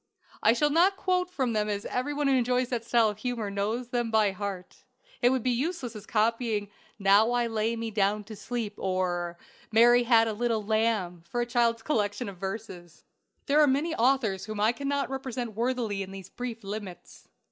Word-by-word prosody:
I 220 Hz, -, +5 dB
shall 295 Hz, +5 st, +2 dB
not 365 Hz, +5 st, +4 dB
quote 365 Hz, -1 st, 0 dB
from 260 Hz, -9 st, -1 dB
them, 210 Hz, -1 st, 0 dB
as 205 Hz, 0 st, -3 dB
every 255 Hz, +3 st, -2 dB
one 290 Hz, 0 st, -1 dB
who 275 Hz, -, +3 dB
enjoys 250 Hz, 0 st, +1 dB
that 240 Hz, -3 st, -2 dB
style 230 Hz, -1 st, +3 dB
of 210 Hz, 0 st, -7 dB
humor 230 Hz, -4 st, -3 dB
knows 220 Hz, +5 st, -2 dB
them 240 Hz, -2 st, -1 dB
by 215 Hz, -2 st, +3 dB
heart. 190 Hz, -1 st, -6 dB, 0.4 s
It 245 Hz, -, +5 dB
would 260 Hz, -2 st, 0 dB
be 255 Hz, -, +2 dB
as 240 Hz, -, 0 dB
useless 275 Hz, -6 st, -3 dB
as 210 Hz, 0 st, -9 dB
copying 220 Hz, -2 st, 0 dB, 0.3 s
"Now 200 Hz, +2 st, +5 dB
I 240 Hz, -1 st, +2 dB
lay 225 Hz, 0 st, -1 dB
me 230 Hz, -1 st, -4 dB
down 210 Hz, 0 st, +1 dB
to 215 Hz, +1 st, -10 dB
sleep," 215 Hz, +1 st, -4 dB
or 175 Hz, -2 st, -1 dB, 0.3 s
"Mary 240 Hz, +2 st, +6 dB
had 230 Hz, -2 st, +4 dB
a 220 Hz, -, -1 dB
little 225 Hz, -1 st, -1 dB
lamb," 215 Hz, -6 st, 0 dB
for 240 Hz, -, -2 dB
a 240 Hz, -, +1 dB
child's 235 Hz, -1 st, +1 dB
collection 205 Hz, -9 st, -1 dB
of 195 Hz, -, -10 dB
verses! 190 Hz, -4 st, -7 dB, 0.4 s
There 295 Hz, +2 st, +4 dB
are 300 Hz, -, +6 dB
many 290 Hz, +5 st, +1 dB
authors 235 Hz, -7 st, +1 dB
whom 215 Hz, -1 st, -5 dB
I 215 Hz, +2 st, +4 dB
cannot 280 Hz, +2 st, -2 dB
represent 255 Hz, -3 st, -4 dB
worthily 230 Hz, -3 st, -1 dB
in 190 Hz, -, -5 dB
these 195 Hz, -1 st, -9 dB
brief 240 Hz, -3 st, -6 dB
limits. 195 Hz, -3 st, -8 dB
225 Hz, 200 wpm, -28 LUFS, 205-250 Hz, 0.4 s, Mary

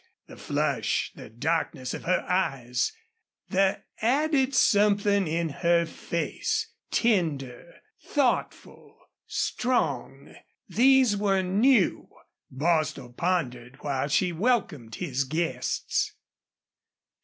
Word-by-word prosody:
The -, -, -13 dB
flush, -, -, -1 dB
the -, -, -11 dB
darkness 130 Hz, +1 st, -2 dB
of -, -, -7 dB
her 185 Hz, -, +1 dB
eyes, 135 Hz, -10 st, 0 dB, 0.6 s
the 190 Hz, 0 st, +1 dB, 0.2 s
added 270 Hz, +2 st, +2 dB
something 205 Hz, -2 st, +3 dB
in 165 Hz, +1 st, -1 dB
her 170 Hz, +2 st, +2 dB
face, 170 Hz, +1 st, -3 dB, 0.2 s
tender, 160 Hz, -, -1 dB, 0.3 s
thoughtful, 275 Hz, -5 st, -2 dB, 0.3 s
strong 250 Hz, 0 st, -2 dB, 0.3 s
these 260 Hz, -3 st, +4 dB
were 195 Hz, -2 st, +1 dB
new. 205 Hz, +3 st, +2 dB, 0.4 s
Bostil 155 Hz, -3 st, -1 dB
pondered 130 Hz, -7 st, -2 dB
while 140 Hz, -1 st, -1 dB
she 175 Hz, +5 st, +1 dB
welcomed 165 Hz, -, -1 dB
his 135 Hz, 0 st, -2 dB
guests. 135 Hz, -2 st, -2 dB
175 Hz, 90 wpm, -27 LUFS, 140-210 Hz, 0.6 s, these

